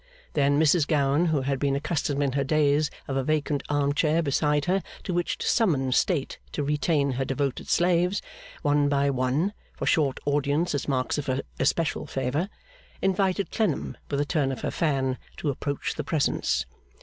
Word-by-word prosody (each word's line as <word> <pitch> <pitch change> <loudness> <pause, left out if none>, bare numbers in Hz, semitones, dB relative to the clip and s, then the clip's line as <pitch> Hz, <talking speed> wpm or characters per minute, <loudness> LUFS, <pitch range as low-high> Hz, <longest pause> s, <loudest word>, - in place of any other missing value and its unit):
Then 145 -1 +3
Mrs 155 0 +4
Gowan, 145 +2 +2
who 155 -4 +1
had 135 0 -1
been 140 0 +1
accustomed 145 -1 -1
in 140 - +1
her 140 +1 0
days 150 +1 +2 0.2
of 135 - -2
a 135 - +1
vacant 150 0 0
arm 145 -1 +1
chair 155 +3 +2
beside 150 0 +1
her 190 +2 +2 0.2
to 185 - -3
which 175 0 -1
to - - -4
summon 145 - +2
state 145 +1 +1
to 145 - -1
retain 145 0 +1
her 130 +1 -1
devoted 135 0 -2
slaves, 180 +2 +2 0.4
one 145 -1 +3
by 140 0 +2
one, 135 +9 0 0.2
for - - -3
short 140 -5 +2
audiences 145 +4 +1
as 145 - -2
marks 130 +1 0
of 145 - -5
her 130 +1 0 0.2
especial 150 +3 0
favour, 135 +8 -1 0.5
invited 195 0 +1
Clennam 220 -2 -1
with 140 - -1
a 145 - +1
turn 145 -3 0
of 130 - -5
her - - -2
fan 135 -5 0 0.2
to 145 - -1
approach 140 +1 -3
the - - -4
presence. 140 - 0
145 Hz, 180 wpm, -26 LUFS, 140-160 Hz, 0.5 s, Mrs